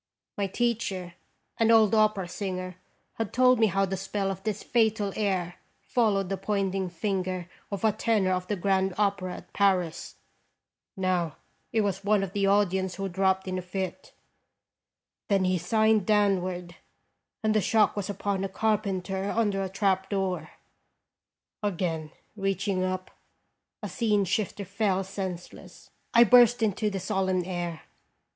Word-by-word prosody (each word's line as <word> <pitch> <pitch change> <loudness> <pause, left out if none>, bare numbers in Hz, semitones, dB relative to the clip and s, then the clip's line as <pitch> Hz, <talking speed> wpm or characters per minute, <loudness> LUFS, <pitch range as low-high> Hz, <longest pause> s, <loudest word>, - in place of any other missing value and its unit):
My 200 -1 -1
teacher, 195 -5 -2 0.5
an 225 -1 +4
old 225 -2 +6
opera 215 -4 +3
singer, 185 -1 -5 0.4
had 225 -3 -2
told 255 -1 +4
me 220 - +5
how 195 0 +1
the 190 0 -3
spell 195 +1 -2
of 190 0 -6
this 210 0 -3
fatal 220 -4 +1
air 185 -4 -1 0.2
followed 205 -6 +1
the 195 - -1
pointing 195 -1 -1
finger 185 0 -2 0.2
of 200 -3 -5
a 220 - +5
tenor 210 -3 +1
of 180 0 -1
the 210 - -1
Grand 190 0 +1
Opera 195 -3 0
at 180 - -13
Paris: 185 -5 +1 0.8
now 180 -5 0 0.4
it 225 - +2
was 200 -1 -1
one 205 -1 +3
of 195 -1 -5
the 200 -1 +1
audience 190 -2 +2
who 195 0 -3
dropped 190 +1 +1
in 185 0 -2
a - - -4
fit; 185 0 -5 1.2
then 195 -2 +2
he 185 -1 +1
signed 220 +2 +2
downward, 185 -4 +1 0.7
and 215 0 +2
the 215 - +3
shock 220 0 +3
was 205 -1 -3
upon 200 -1 -2
a 195 - -2
carpenter 195 -2 -1
under 205 -4 +1
a 190 - -2
trap 190 -1 0
door; 190 -2 -2 1.1
again, 170 -6 -2 0.3
reaching 195 -1 -1
up, 185 0 -3 0.7
a - - -2
scene 210 -4 +1
shifter 200 +1 -2
fell 195 0 0
senseless. 190 -2 -7 0.2
I 235 - +7
burst 245 -1 +6
into 215 0 +1
the 195 -1 -3
solemn 190 -1 0
air. 175 -3 -4
195 Hz, 150 wpm, -27 LUFS, 185-210 Hz, 1.2 s, I